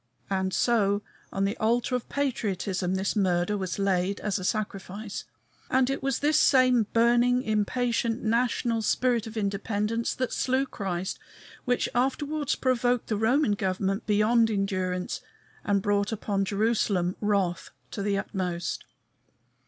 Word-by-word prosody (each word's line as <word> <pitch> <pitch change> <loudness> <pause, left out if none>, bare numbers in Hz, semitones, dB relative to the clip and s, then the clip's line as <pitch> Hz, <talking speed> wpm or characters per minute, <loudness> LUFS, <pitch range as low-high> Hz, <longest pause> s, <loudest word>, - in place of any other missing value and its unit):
And 190 -1 0
so, 205 -2 +2 0.3
on 195 0 0
the 200 +3 -1
altar 235 +3 +1
of 250 -2 -2
patriotism 200 -9 -1
this 190 +3 -1
murder 185 -1 +1
was 190 -3 -3
laid 195 0 0
as 210 -1 -1
a - - -6
sacrifice. 205 0 -3 0.4
And 260 0 +3
it 275 - -3
was 270 -2 0
this 300 +1 +3
same 255 -5 +4
burning, 240 +2 +3
impatient 230 +2 0
national 230 0 +1
spirit 235 0 +1
of 225 0 -8
independence 210 +2 -1
that 255 -1 -2
slew 260 +1 +1
Christ 190 -7 -4 0.5
which 245 -1 +1
afterwards 280 +4 0
provoked 250 -2 +1
the 215 - +1
Roman 225 +4 +2
government 195 +1 -1
beyond 220 +2 +3
endurance, 185 -3 -2 0.4
and 200 -1 +1
brought 205 0 +1
upon 200 -2 -1
Jerusalem 200 -3 +1
wrath 195 -5 0 0.2
to - - -4
the 200 0 0
uttermost. 180 -4 -3
210 Hz, 135 wpm, -27 LUFS, 195-240 Hz, 0.5 s, same